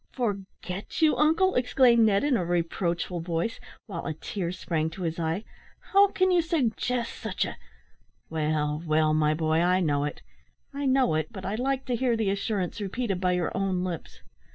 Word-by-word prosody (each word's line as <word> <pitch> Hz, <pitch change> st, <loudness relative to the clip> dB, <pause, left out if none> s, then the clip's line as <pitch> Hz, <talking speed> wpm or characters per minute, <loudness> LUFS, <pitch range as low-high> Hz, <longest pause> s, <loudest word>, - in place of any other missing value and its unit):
"Forget 200 Hz, -, -4 dB
you, 310 Hz, -, +5 dB
uncle!" 325 Hz, +5 st, +3 dB
exclaimed 245 Hz, -2 st, +4 dB
Ned, 200 Hz, -1 st, +2 dB
in 285 Hz, -3 st, +2 dB
a 195 Hz, -, +1 dB
reproachful 175 Hz, +1 st, -1 dB
voice, 170 Hz, +6 st, -2 dB, 0.3 s
while 205 Hz, -, -6 dB
a 160 Hz, -, -3 dB
tear 175 Hz, +2 st, -4 dB
sprang 165 Hz, -3 st, -2 dB
to 180 Hz, +3 st, -7 dB
his 165 Hz, 0 st, -2 dB
eye. 165 Hz, +5 st, -1 dB, 0.5 s
"How 400 Hz, +1 st, +7 dB
can 375 Hz, -1 st, +1 dB
you 355 Hz, -1 st, +4 dB
suggest 250 Hz, -6 st, -1 dB
such -, -, -2 dB
a -, -, -6 dB, 0.4 s
" -, -, -41 dB
"Well, 150 Hz, -1 st, 0 dB
well, 155 Hz, -1 st, +2 dB
my 155 Hz, 0 st, +2 dB
boy, 160 Hz, 0 st, +1 dB
I 180 Hz, +2 st, +3 dB
know 145 Hz, -5 st, +1 dB
it 145 Hz, -, -6 dB, 0.5 s
I 280 Hz, 0 st, -2 dB
know 260 Hz, -6 st, +3 dB
it; 155 Hz, +3 st, -1 dB
but 190 Hz, -4 st, -8 dB
I 195 Hz, -, -2 dB
like 265 Hz, +4 st, -1 dB
to 250 Hz, -, 0 dB
hear 240 Hz, -1 st, +1 dB
the 215 Hz, -3 st, +1 dB
assurance 200 Hz, -1 st, -2 dB
repeated 200 Hz, -1 st, -2 dB
by 180 Hz, -1 st, +2 dB
your 180 Hz, -2 st, -1 dB
own 190 Hz, -2 st, 0 dB
lips. 175 Hz, -4 st, -6 dB
190 Hz, 185 wpm, -27 LUFS, 165-245 Hz, 0.5 s, How